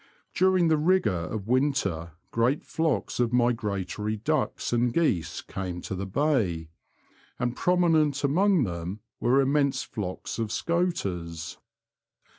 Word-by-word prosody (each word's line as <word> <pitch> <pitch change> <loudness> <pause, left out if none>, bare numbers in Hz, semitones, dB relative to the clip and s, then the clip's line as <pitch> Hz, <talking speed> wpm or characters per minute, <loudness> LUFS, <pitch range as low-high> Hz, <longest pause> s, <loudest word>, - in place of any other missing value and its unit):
During 185 -2 +3
the 155 -1 +3
rigour 180 - +3 0.2
of 110 -2 -5
winter 115 - 0 0.2
great 120 +5 +1
flocks 150 - -1
of 120 -2 +2
migratory 110 -4 0
ducks 150 +2 -1
and 120 0 +2
geese 95 - 0
came 90 -2 -5
to - - -5
the 95 +1 -4
bay, 100 - 0 0.7
and 125 0 -1
prominent 160 -5 +2
among 180 +4 +3
them 90 +1 -4 0.2
were 130 +3 +3
immense 140 -1 +1
flocks 95 +1 -5
of 110 -2 -2
scoters. 95 - -2
120 Hz, 120 wpm, -27 LUFS, 95-155 Hz, 0.7 s, During